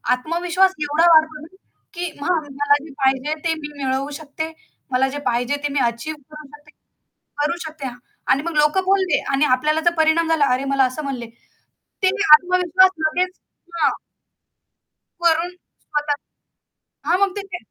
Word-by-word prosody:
आत्मविश्वास 350 +7 +1
एवढा 300 +3 +2
वाढतो 315 -1 +3
ना, 310 - -10 0.5
की 350 -1 -4
मग 320 -2 0
मला 285 +1 +2
जे 310 - -11
पाहिजे 265 +3 +1
ते 325 - +2
मी 295 -1 -8
मिळवू 265 +2 -1
शकते. 315 +2 -6 0.4
मला 260 +1 +2
जे 290 - -6
पाहिजे 245 +4 0
ते 290 - -1
मी 285 - +1
अचीव्ह 300 +6 -7
करू 305 -1 -11
शकते 295 0 -20 0.7
करू 340 +4 0
शकते. 305 -4 -6 0.4
आणि 275 +2 +2
मग 335 -2 -4
लोक 300 +5 +3
बोलले 380 -4 +2
आणि 275 +2 +3
आपल्याला 305 +4 0
जर 345 +1 +2
परिणाम 320 +1 +3
झाला, 310 -3 +3
"अरे, 260 +2 0
मला 270 -1 +4
असं 255 +4 -3
म्हणले." 255 -4 -4 0.8
त्यानी 400 +2 +2
आत्मविश्वास 365 +2 +4 0.2
लगेच 365 +3 -1 0.4
हां. - - +4 1.3
वरून 335 +1 +2
स्वतः 295 -4 -5 1.0
हां, 355 - +4
मग 400 -1 +2
ते - - -2
ते 360 -2 -5
310 Hz, 155 wpm, -21 LUFS, 285-345 Hz, 1.3 s, मला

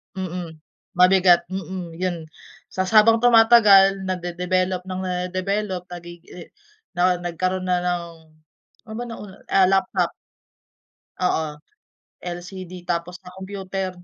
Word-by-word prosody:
Mm, 180 -3 -6 0.4
mabigat, 180 -1 +5
mm, 185 -2 -5
yun. 180 -3 -2 0.5
Ta's 185 0 -2
habang 225 +1 +6
tumatagal 225 -5 +6
nade-develop 180 +1 -2
ng 185 0 -4
nade-develop 185 +1 -2
nagi 175 -1 -10
eh, 175 - -11 0.5
nao 180 0 +2
nagkaroon 185 +2 -2
na 180 -1 +2
ng, 175 -1 -1 0.9
ano - - -7
bang 245 - -5
nauna, 205 -3 -10 0.2
ah, 190 -1 +5
laptop. 195 0 +1 1.1
Oo. 160 -4 -1 0.7
LCD 180 0 -8
tapos 175 +1 -3
sa 180 -1 -14
computer, 190 0 -5
185 Hz, 110 wpm, -22 LUFS, 175-190 Hz, 1.1 s, habang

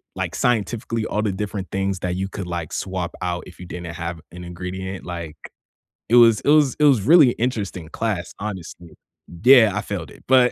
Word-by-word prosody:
like - - -3
scientifically, 115 0 -1
all 105 - -1
the 105 -2 0
different 100 -1 -4
things 95 -1 -1
that 90 0 -2
you 95 - -2
could 95 -1 -6
like 85 -3 -4
swap 95 -2 -3
out 90 -1 -2
if 90 -1 -15
you 90 - -7
didn't 85 -1 -7
have 85 0 -5
an 90 0 -9
ingredient. 95 +2 -6
Like 85 -3 -6 0.7
it 120 - +4
was 115 -3 +6
it - - -1
was 150 -3 +5
it - - +2
was 135 -8 +5
really 150 - +7
a - - -4
interesting 100 -9 -2
class, 95 -5 -3
honestly. 95 -4 -7 0.5
Yeah, 125 -4 +7
I 105 - 0
failed 100 -7 -5
it. - - -16
But 125 -1 +5
95 Hz, 200 wpm, -22 LUFS, 90-115 Hz, 0.7 s, really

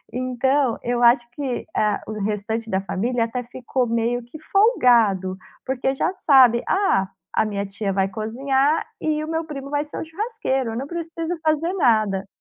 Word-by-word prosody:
Então, 255 +1 +1
eu 240 0 -1
acho 240 0 +5
que 260 -1 -4
a 210 -1 +1
o 215 - -4
restante 215 +2 -2
da 190 - +1
família 230 +5 -1
até 230 +2 -3
ficou 250 +1 -2
meio 235 +1 0
que 245 +6 -11
folgado, 240 - +3 0.3
porque 265 0 0
já 350 +7 0
sabe: 255 -9 +5
"Ah, 195 - +2 0.3
a - - +2
minha 200 -1 -2
tia 200 +1 -3
vai 195 0 +1
cozinhar 265 - 0 0.2
e 305 -1 0
o - - -5
meu 325 +1 -1
primo 280 -3 -7
vai 290 0 +1
ser 295 - -9
o - - -4
churrasqueiro, 325 - -2
eu - - -4
não 265 - -3
preciso 330 +1 -4
fazer 315 +3 +1
nada". 215 - +2
250 Hz, 175 wpm, -22 LUFS, 220-300 Hz, 0.3 s, acho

